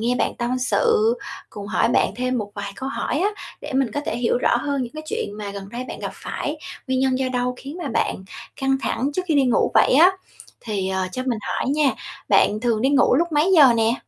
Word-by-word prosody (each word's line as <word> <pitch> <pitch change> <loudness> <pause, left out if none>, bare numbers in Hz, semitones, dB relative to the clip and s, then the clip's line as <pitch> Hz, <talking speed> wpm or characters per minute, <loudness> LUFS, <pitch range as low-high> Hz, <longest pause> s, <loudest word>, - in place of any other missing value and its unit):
nghe 240 +2 +1
bạn - - +1
tâm 245 +1 -1
sự, 450 - +2 0.4
cùng 205 -1 -8
hỏi 210 - +1
bạn - - +2
thêm 255 0 -1
một 205 -2 -5
vài 200 -1 -5
câu 265 - -4
hỏi 275 - -2
á 400 - +3 0.3
để 295 - -7
mình 265 -4 +1
có 290 - -1
thể - - -1
hiểu 240 0 +1
rõ 245 - +2
hơn 280 +2 -1
những 240 - -6
cái 310 - -7
chuyện 450 +7 -3
mà 205 -1 -5
gần 200 -1 -8
đây 240 +4 -5
bạn - - -7
gặp - - -4
phải, 295 - -4 0.3
nguyên 260 0 0
nhân 260 -1 +1
do 265 - 0
đâu 250 0 -1
khiến 280 +6 -8
mà 285 - -3
bạn 190 - -1 0.3
căng 270 -1 +1
thẳng 270 +4 -1
trước 365 +5 -1
khi 320 - +2
đi 280 -2 +4
ngủ 245 - +2
vậy - - +5
á. 340 +6 +7 0.5
Thì, 200 -4 -3
ờ, 190 -1 -1
cho 255 - -3
mình 235 -3 0
hỏi - - -2
nha, 290 -1 +3 0.4
bạn 210 - +3
thường 230 -1 0
đi 265 - +3
ngủ 280 -3 +4
lúc 335 +4 +1
mấy 305 +6 +3
giờ 285 -8 +8
nè? 225 +1 +2
255 Hz, 245 wpm, -22 LUFS, 235-290 Hz, 0.5 s, giờ